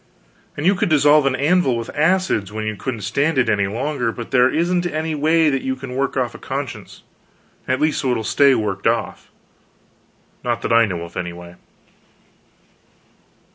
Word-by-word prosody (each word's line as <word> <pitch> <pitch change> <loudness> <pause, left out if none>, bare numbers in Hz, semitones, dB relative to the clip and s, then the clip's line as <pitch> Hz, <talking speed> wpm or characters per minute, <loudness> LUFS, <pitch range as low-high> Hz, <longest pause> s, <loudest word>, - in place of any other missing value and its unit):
And 145 - -3
you 190 - +5
could 180 - -1
dissolve 150 -1 +4
an 130 - +1
anvil 145 -2 +2
with 115 +1 -5
acids, 155 - +1
when 110 0 -4
you 110 0 -3
couldn't 115 +2 -5
stand 140 +9 0
it 130 - +3
any 100 -2 +1
longer; 125 +2 -2
but 115 0 -8
there 125 0 +4
isn't 175 +4 0
any 160 -1 -3
way 155 +1 +2
that 135 -1 -1
you 130 0 -2
can 130 -1 -8
work 135 0 -1
off 125 -2 -1
a - - -11
conscience - - -6 0.6
at 130 0 0
least 155 0 +1
so 135 - -1
it - - +1
will 110 - -3
stay 140 +5 +4
worked 100 -3 -2
off; 115 0 -2 1.1
not 120 -1 -2
that - - 0
I 115 0 +6
know 90 -4 -4
of, 85 - -11
anyway. 85 0 -6
130 Hz, 180 wpm, -20 LUFS, 110-150 Hz, 1.1 s, I